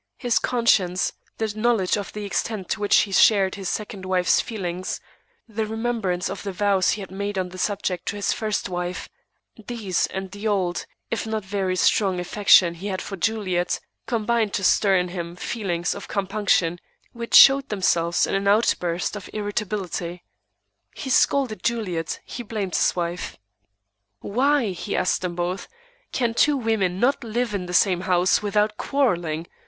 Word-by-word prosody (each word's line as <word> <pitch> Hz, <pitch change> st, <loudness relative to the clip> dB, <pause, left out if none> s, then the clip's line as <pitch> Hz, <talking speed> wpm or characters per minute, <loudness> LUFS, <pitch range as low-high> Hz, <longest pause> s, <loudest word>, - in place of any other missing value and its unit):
His 245 Hz, -3 st, +1 dB
conscience, 200 Hz, -7 st, +2 dB, 0.2 s
the 220 Hz, -2 st, -2 dB
knowledge 215 Hz, -4 st, +2 dB
of 205 Hz, -2 st, -5 dB
the 210 Hz, -1 st, -6 dB
extent 200 Hz, -1 st, -3 dB
to -, -, -1 dB
which 205 Hz, -1 st, +4 dB
he 200 Hz, -, -3 dB
shared 195 Hz, 0 st, +5 dB
his 195 Hz, -2 st, -4 dB
second 210 Hz, -2 st, -4 dB
wife's 185 Hz, -1 st, +2 dB
feelings, 185 Hz, -4 st, -4 dB, 0.5 s
the 220 Hz, -1 st, -3 dB
remembrance 220 Hz, -5 st, -1 dB
of -, -, -5 dB
the 200 Hz, -, -4 dB
vows 195 Hz, 0 st, +2 dB
he 210 Hz, -, -5 dB
had 190 Hz, -, -9 dB
made 200 Hz, +1 st, -4 dB
on 185 Hz, -1 st, -1 dB
the 185 Hz, +1 st, -10 dB
subject 190 Hz, -3 st, -2 dB
to -, -, -2 dB
his 205 Hz, -, 0 dB
first 215 Hz, -2 st, -2 dB
wife, 180 Hz, -1 st, -4 dB, 0.6 s
these 215 Hz, -7 st, -1 dB
and 190 Hz, -1 st, -6 dB
the 205 Hz, +2 st, -4 dB
old, 185 Hz, -4 st, -1 dB, 0.2 s
if 225 Hz, -1 st, -2 dB
not 220 Hz, -2 st, -3 dB
very 195 Hz, -2 st, -1 dB
strong, 190 Hz, 0 st, +2 dB
affection 180 Hz, -1 st, +5 dB
he 175 Hz, +4 st, -7 dB
had 190 Hz, -2 st, -2 dB
for 195 Hz, -, -6 dB
Juliet, 185 Hz, -3 st, -1 dB, 0.3 s
combined 230 Hz, -2 st, 0 dB
to 195 Hz, -, -2 dB
stir 195 Hz, +1 st, +4 dB
in 180 Hz, -1 st, +1 dB
him 175 Hz, -1 st, -5 dB
feelings 180 Hz, -3 st, -2 dB
of 200 Hz, -, -8 dB
compunction 195 Hz, -4 st, 0 dB, 0.3 s
which 235 Hz, 0 st, -2 dB
showed 275 Hz, 0 st, +8 dB
themselves 175 Hz, -4 st, +2 dB
in -, -, -4 dB
an 195 Hz, 0 st, 0 dB
outburst 180 Hz, -4 st, +1 dB
of 205 Hz, -3 st, -8 dB
irritability. 205 Hz, -5 st, -3 dB, 0.7 s
He 265 Hz, -, -5 dB
scolded 255 Hz, -5 st, +2 dB
Juliet; 190 Hz, -9 st, -2 dB
he 245 Hz, -, -6 dB
blamed 210 Hz, -5 st, -4 dB
his -, -, +2 dB
wife. 175 Hz, 0 st, -3 dB, 0.8 s
"Why," 255 Hz, 0 st, +1 dB
he 180 Hz, -, -4 dB
asked 180 Hz, -, +1 dB
them 180 Hz, -2 st, -3 dB
both, 180 Hz, +2 st, -3 dB, 0.4 s
"can 235 Hz, -3 st, 0 dB
two 290 Hz, +4 st, +3 dB
women 210 Hz, -7 st, 0 dB
not 260 Hz, +4 st, +2 dB
live 235 Hz, 0 st, -2 dB
in 185 Hz, -3 st, -3 dB
the -, -, -6 dB
same 180 Hz, -1 st, +3 dB
house 185 Hz, 0 st, +2 dB
without 210 Hz, +1 st, +1 dB
quarrelling? 175 Hz, -, 0 dB
200 Hz, 165 wpm, -23 LUFS, 180-220 Hz, 0.8 s, showed